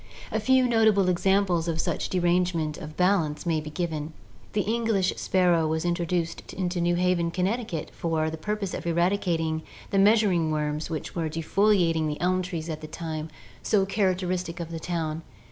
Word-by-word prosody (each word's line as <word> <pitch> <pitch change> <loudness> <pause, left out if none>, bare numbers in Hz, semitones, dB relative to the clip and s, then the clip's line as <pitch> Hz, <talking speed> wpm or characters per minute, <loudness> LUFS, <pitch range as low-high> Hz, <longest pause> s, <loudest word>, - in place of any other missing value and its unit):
A - - 0
few 260 -1 +4
notable 220 -5 +4
examples 180 -1 +2
of 165 -1 -1
such - - -1
derangement 175 -3 +1
of 155 - -7
the 155 - -14
balance 180 -5 +1
may 160 -2 +1
be 150 - -7
given. 155 -1 -3 0.4
The 205 - +2
English 220 -4 +1
sparrow 175 -4 +2
was 160 +1 -1
introduced 170 -1 -2
into 180 -1 -2
New 175 0 +2
Haven, 175 -1 +1
Connecticut, 185 -1 -2
for 160 -2 -1
the - - -4
purpose 205 +3 -3
of - - -4
eradicating 170 -2 +1 0.3
the 195 - +3
measuring 195 -5 +4
worms 150 0 -2
which 160 -2 -4
were 165 -2 -2
defoliating 165 0 +2
the 150 0 -3
elm 185 +1 +1
trees 170 -3 -4
at 155 -2 -5
the 155 - -7
time 160 -1 -5 0.3
so 200 -3 +2
characteristic 185 -3 -1
of 170 -1 -5
the 165 - -4
town. 160 -2 -3
175 Hz, 170 wpm, -26 LUFS, 160-190 Hz, 0.4 s, few